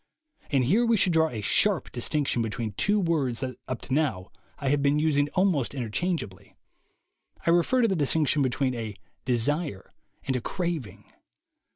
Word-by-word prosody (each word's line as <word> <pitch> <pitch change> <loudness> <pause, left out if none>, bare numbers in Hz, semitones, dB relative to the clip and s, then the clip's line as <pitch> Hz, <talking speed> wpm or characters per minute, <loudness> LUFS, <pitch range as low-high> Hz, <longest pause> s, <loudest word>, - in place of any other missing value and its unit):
And 135 -3 +2
here 195 - +3
we 230 -1 +3
should 185 -2 +2
draw 160 0 +3
a 110 -5 -5
sharp 190 - +1
distinction 130 0 0
between 115 0 -3
two 205 - +1
words 150 -10 0
that 130 -2 -4
up 130 -2 -4
to - - -5
now 130 -12 0 0.3
I 135 - -2
have 145 +1 +2
been 140 +1 +3
using 145 -2 +2
almost 180 -9 +1
interchangeably. 115 - -3 0.9
I 170 - +4
refer 175 +9 +3
to - - +5
the 195 - 0
distinction 150 -1 +1
between 130 0 0
a 110 -4 -5 0.3
desire 125 - -1 0.3
and 130 - -1
a 125 - -1
crazing. 170 - -4
140 Hz, 165 wpm, -27 LUFS, 120-170 Hz, 0.9 s, to